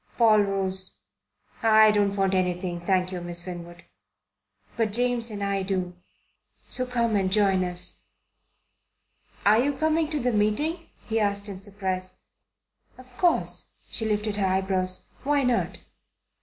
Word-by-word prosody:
Paul 220 -3 +6
rose. 190 -1 -2 0.6
"I 220 -2 +6
don't 205 -1 +1
want 195 -1 +1
anything, 180 -1 -1
thank 185 0 +1
you, 180 -1 -4
Miss 175 0 -2
Winwood." 175 -1 -8 0.9
"But 220 -3 0
James 245 0 +2
and 205 -2 -4
I 200 0 0
do. 185 -2 -2 0.7
So 255 0 -1
come 235 -3 0
and 190 -2 +1
join 195 -2 +3
us." 180 -1 -4 1.5
"Are 210 +2 +6
you 285 +4 +2
coming 315 +2 +1
to 305 -2 -1
the 250 -2 0
meeting?" 295 +12 0 0.2
he 225 0 -1
asked 200 -1 0
in 190 -1 -7
surprise. 190 -2 -3 0.8
"Of 255 -1 -16
course." 350 -2 +1 0.2
She 225 - -3
lifted 210 -1 -1
her 195 -2 +1
eyebrows. 185 -1 0 0.2
"Why 285 0 +2
not?" 250 -2 0
200 Hz, 140 wpm, -26 LUFS, 185-230 Hz, 1.5 s, Paul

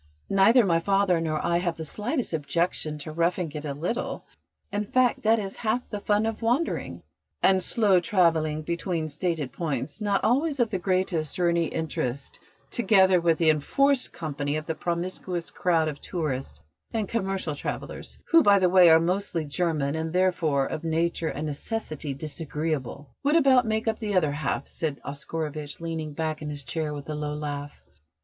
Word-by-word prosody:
"Neither 215 +5 +6
my 165 -3 +3
father 195 -2 +2
nor 155 -2 -1
I 170 0 +2
have 175 -2 -2
the 160 - -5
slightest 230 - -2
objection 160 0 -1
to 150 +1 -7
roughing 170 +1 0
it 150 0 -6
a 140 -2 -3
little. 180 - -3 0.5
In 205 +1 -1
fact, 250 +3 +2
that 225 +1 +4
is 200 -3 -4
half 235 +2 -1
the 210 - -3
fun 210 +1 +1
of 225 0 -3
wandering." 245 +9 -1 0.4
"And 190 -1 +5
slow 200 -2 +3
travelling 165 -3 +2
between 170 -1 -2
stated 155 -3 -2
points, 145 - -3
not 205 -2 +1
always 280 +4 +2
of 235 -2 +2
the 190 - -1
greatest 180 -4 0
or 175 -1 +3
any 170 -1 +2
interest, 140 -5 -3 0.3
together 190 -6 +4
with 165 -1 +3
the 160 -2 +5
enforced 275 - +1
company 145 -3 -3
of 155 0 -4
a 160 - 0
promiscuous 175 +1 -3
crowd 165 -3 +1
of 150 -2 -5
tourists 135 - -3 0.3
and 220 -3 -1
commercial 195 -7 -2
travellers, 145 - -6
who, 330 -1 +8
by 205 -7 +6
the 185 -2 +3
way, 180 -1 +7
are 160 0 +8
mostly 175 -1 -1
German, 150 -2 0
and 160 0 -2
therefore 170 -7 +2
of 155 - -4
nature 165 0 0
and 150 - -4
necessity 155 -2 -4
disagreeable, 150 -1 -4
would 290 +3 +2
about 265 -6 +5
make 220 +1 -1
up 220 - 0
the 210 -3 -2
other 155 -5 +3
half," 140 -1 -2
said 150 -3 -3
Oscarovitch, 145 +1 -5
leaning 160 -2 -4
back 155 0 -3
in 150 - -4
his 145 -1 -5
chair 150 +5 -3
with 145 -1 -7
a 155 - -3
low 150 0 -3
laugh. 145 -1 -5
165 Hz, 175 wpm, -26 LUFS, 150-195 Hz, 0.5 s, who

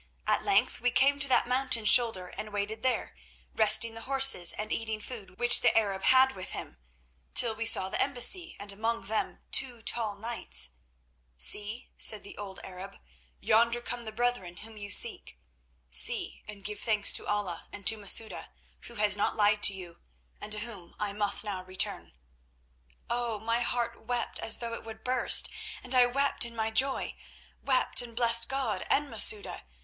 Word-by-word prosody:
At - - 0
length 210 +5 0
we 245 - 0
came 280 +3 +2
to 280 - 0
that 260 - +1
mountain 250 -3 -1
shoulder 210 -5 +4
and 215 +3 -9
waited 205 +2 -5
there, 260 0 -3 0.4
resting 225 +1 +4
the 225 - -10
horses 270 -10 +4
and 215 0 -6
eating 220 -1 -3
food 205 -5 -11
which 240 0 +4
the - - +2
Arab 195 -3 -2
had 260 0 +5
with 185 -1 -8
him, 60 - -9 0.6
till 230 -2 +8
we 225 +1 -2
saw 190 -4 +5
the - - -3
embassy, 285 +7 +1
and 205 0 -1
among 225 +2 -4
them 215 +3 -4
two 245 -4 +1
tall 220 -4 -3
knights. 210 - -3 0.7
"'See,' 210 - -3
said 215 - +4
the - - -12
old 200 -2 -10
Arab, 190 +1 -11 0.4
'yonder 235 +2 +1
come 240 0 -6
the 220 -2 -9
brethren 215 -6 -4
whom 220 +1 -11
you 205 -1 -10
seek. 65 - 0 0.5
See 65 +2 +2
and 205 -2 -11
give 210 0 -5
thanks 210 -2 +1
to - - -4
Allah 205 -4 -5
and 200 - -11
to 225 - +4
Masouda, 220 +1 0 0.4
who 235 - -12
has 210 -2 +1
not 205 - -2
lied 210 -1 +1
to 200 - +5
you, 175 -3 -12 0.4
and 215 - -9
to 210 0 +1
whom 205 -7 -8
I 205 -1 -4
must 205 +1 +4
now 195 -3 -6
return.' 185 - -3 0.9
"Oh! 235 -2 -3
my 230 +2 -2
heart 240 0 -4
wept 245 -1 -2
as 225 - +3
though 235 -1 -6
it - - -8
would 220 -1 -12
burst, 255 0 +4 0.4
and 250 - -3
I 250 -1 +4
wept 275 +3 +1
in 235 -1 -2
my 220 0 -3
joy—wept 260 +1 -1
and 235 -2 -11
blessed 230 -1 +3
God 260 -8 -3
and 290 +1 0
Masouda. 430 -1 +4
220 Hz, 175 wpm, -27 LUFS, 205-240 Hz, 0.9 s, till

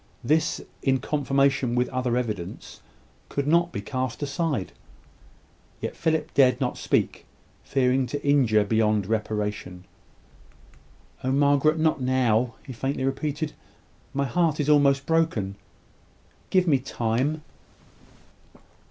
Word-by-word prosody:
this, 160 +6 +1 0.2
in 135 -1 +2
confirmation 135 -2 +1
with 125 0 +2
other 125 -1 -1
evidence, 105 -8 -5 0.5
could 140 - -2
not 170 +3 +3
be - - -4
cast 130 +4 -3
aside. 145 - -2 1.1
Yet - - -4
Philip 160 -1 -1
dared 130 -2 +4
not 125 -3 -1
speak, - - -1 0.4
fearing 130 -1 +1
to 145 +3 -5
injure 120 -7 +4
beyond 105 -1 +1
reparation. 105 -4 -3 1.4
"Oh, 130 - 0
Margaret, 145 +3 +3
not 155 -3 +1
now!" 125 -2 +1
he 130 - -7
faintly 135 +3 -2
repeated. 150 +3 -2 0.6
"My 140 0 -1
heart 160 +3 +1
is 145 0 0
almost 140 -2 +4
broken! 160 -12 +1 1.0
Give 185 -1 +3
me 145 -6 +3
time." 130 +4 -1
135 Hz, 115 wpm, -25 LUFS, 120-145 Hz, 1.4 s, dared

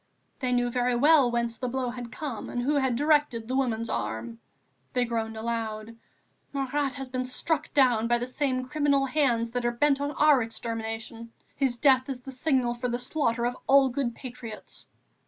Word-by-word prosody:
They 255 -2 -1
knew 245 0 +1
very 245 0 +1
well 285 0 +5
whence 235 -1 -1
the 250 - -3
blow 250 0 -2
had 245 -1 -7
come, 275 -8 -5
and 245 - -3
who 285 +4 +1
had 265 -3 +1
directed 290 -5 +2
the 255 - -2
woman's 230 -4 0
arm. 115 +1 -4 0.5
They 250 -1 +2
groaned 225 -1 -3
aloud: 225 -1 -3 0.6
"Marat 275 0 -1
has 270 -1 -5
been 255 0 -3
struck 315 +5 -1
down 245 -5 +4
by 240 0 +3
the 240 - -3
same 255 0 -1
criminal 285 -1 +2
hands 255 -5 +1
that 245 0 -2
are 240 - +2
bent 280 +3 +2
on 285 - 0
our 295 -2 +5
extermination. 225 0 -5 0.2
His 265 -3 0
death 260 0 +4
is 255 -2 -4
the 270 - -8
signal 260 -2 +1
for 245 +1 -3
the 240 - -1
slaughter 245 -2 -1
of 245 +1 -1
all 275 -1 +6
good 245 -2 -2
patriots." 235 -4 -9
250 Hz, 185 wpm, -27 LUFS, 230-270 Hz, 0.6 s, all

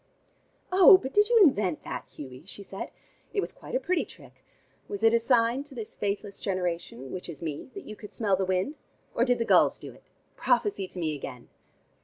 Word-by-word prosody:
"Oh, 375 0 +9
but 265 -5 -6
did 415 +1 +4
you 475 -1 +6
invent 205 - +2
that, - - -6
Hughie?" 130 -1 -10
she 200 - -6
said. 195 0 -7 0.5
"It - - +2
was - - -2
quite - - -8
a - - +3
pretty 365 -7 0
trick. - - -16 0.4
Was 405 -1 -5
it 225 0 +6
a 235 - +5
sign 235 +1 +2
to 285 -2 -10
this 225 -3 -7
faithless 200 0 -3
generation, 175 - -3
which 180 -1 -6
is 160 -1 -8
me, 155 - -5
that 395 - -8
you 215 - -8
could 210 -1 -11
smell 205 -4 +1
the 190 - -1
wind? 190 +11 -1 0.4
Or 235 - +2
did 245 -1 +2
the 230 - -1
gulls - - +5
do - - -10
it? - - -19 0.3
Prophesy 395 - +1
to 185 - -12
me 155 -3 -1
again!" 130 -3 -8
210 Hz, 210 wpm, -28 LUFS, 180-270 Hz, 0.5 s, Oh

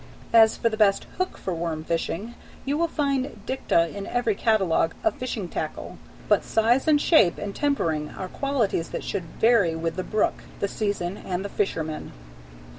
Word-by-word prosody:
As 225 -1 +6
to - - +1
the 220 -1 -1
best 205 -2 +4 0.2
hook 370 - -1
for 185 - -3
worm 165 -2 -3
fishing, 170 +7 -2 0.3
you 280 +1 0
will 335 +2 +1
find 275 -6 -1
dicta 170 -10 +1
in 200 -1 -5
every 245 -3 +1
catalogue 195 -7 +2
of 330 - +3
fishing 235 -7 -3
tackle, - - -5 0.3
but - - +3
size 235 +6 +2
and 300 -2 +5
shape 225 - +4
and 200 -1 -5
tempering 165 - 0
are 185 - -6
qualities 235 -8 -1
that - - -5
should 185 -4 -3
vary 220 -8 +4
with 165 +1 -3
the 185 - -1
brook, 215 +2 0 0.2
the 200 - 0
season, 200 -3 -2
and 185 +1 -4
the - - -4
fisherman. 160 -7 -2
205 Hz, 175 wpm, -25 LUFS, 175-245 Hz, 0.3 s, As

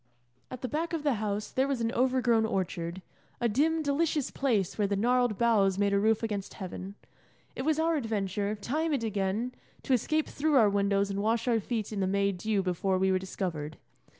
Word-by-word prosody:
At 255 - -8
the - - 0
back 325 +5 -2
of 320 -3 -2
the 290 -3 +2
house 210 0 -2
there 265 +1 +1
was 275 -3 -1
an 230 0 0
overgrown 250 -2 +2
orchard, 180 -3 -2 0.4
a 240 - +2
dim, 310 +8 +1
delicious 295 0 0
place 225 -10 0
where 205 -2 +1
the 200 - 0
gnarled 245 +1 +2
boughs 205 -5 +3
made 200 0 +2
a 200 - +3
roof 220 +2 +2
against 205 -3 -3
heaven. 190 0 -7 0.6
It 260 - -4
was 310 -1 +2
our 325 0 +2
adventure, 205 -4 -1
time 300 +10 -1
and 265 -5 0
again, 210 +3 -1 0.3
to 265 - +1
escape 310 +6 +1
through 300 +1 0
our 220 -6 +5
windows 200 0 +1
and 195 0 -2
wash 225 +3 0
our 230 -2 +3
feet 220 0 -3
in 205 - -3
the 190 - +1
May 200 +1 +2
dew 200 +2 -1
before 185 +1 0
we 190 0 +2
were 185 - +2
discovered. 165 -5 -4
220 Hz, 205 wpm, -29 LUFS, 195-255 Hz, 0.6 s, our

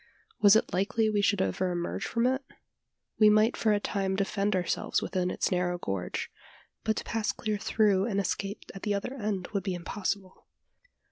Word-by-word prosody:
Was 205 0 +8
it 220 - +2
likely 215 +4 +1
we 205 -1 +2
should 200 -2 +2
ever 185 0 -1
emerge 175 -1 -3
from 230 +1 0
it? 260 +2 +1 0.8
We 215 -1 +8
might 215 +3 +4
for 220 - +2
a 205 - +3
time 195 -2 -1
defend 200 +1 0
ourselves 180 -2 0
within 180 -1 -1
its - - -1
narrow 180 -1 0
gorge; 95 - -3 0.5
but 220 - +1
to - - -3
pass 225 0 -1
clear 215 -2 -3
through 210 -3 +2
and 200 -3 0
escape 200 +1 -3
at 195 - -9
the 205 -1 0
other 200 +6 -3
end 210 -7 -3
would 200 - 0
be 190 -1 -2
impossible. 190 +1 -4
200 Hz, 185 wpm, -29 LUFS, 185-215 Hz, 0.8 s, Was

